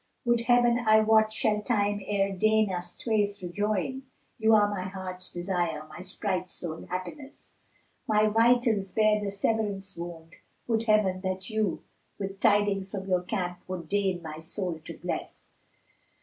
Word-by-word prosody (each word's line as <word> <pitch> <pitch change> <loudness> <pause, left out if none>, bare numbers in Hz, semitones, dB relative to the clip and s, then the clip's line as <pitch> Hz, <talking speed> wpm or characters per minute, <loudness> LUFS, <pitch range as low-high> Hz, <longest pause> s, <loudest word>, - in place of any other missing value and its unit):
Would 240 -1 +3
Heaven 240 0 +4
I 220 -2 +5
wot 220 0 +4
shall 215 -1 +1
Time 205 -3 0
e'er 195 0 0
deign 215 +1 +3
us 175 -1 -3
twain 215 -3 +1 0.2
rejoin! 205 +7 -1 0.2
* - - -42
You 220 0 +5
are 205 -1 +5
my 205 -2 -3
heart's 185 -1 -6
desire, 175 -4 -2
my - - -9
sprite's 185 -1 -3
sole 165 0 -5
happiness: 185 +11 -7 0.5
My 215 0 +4
vitals 225 -3 +3
bear 215 -1 +3
the 200 - -1
Severance 200 -1 -1
wound: 170 -1 -8 0.3
would 230 -1 0
Heaven 210 -4 +3
that 190 +2 -3
you 215 -4 -1 0.2
* - - -43
With 195 -1 -5
tidings 205 -3 +2
from 190 -1 -5
your 180 -2 +2
camp 180 -2 -3
would 180 -3 -5
deign 190 -4 0
my 155 -1 -7
soul 170 0 -3
to - - -8
bless!" - - -5
200 Hz, 160 wpm, -28 LUFS, 185-215 Hz, 0.5 s, I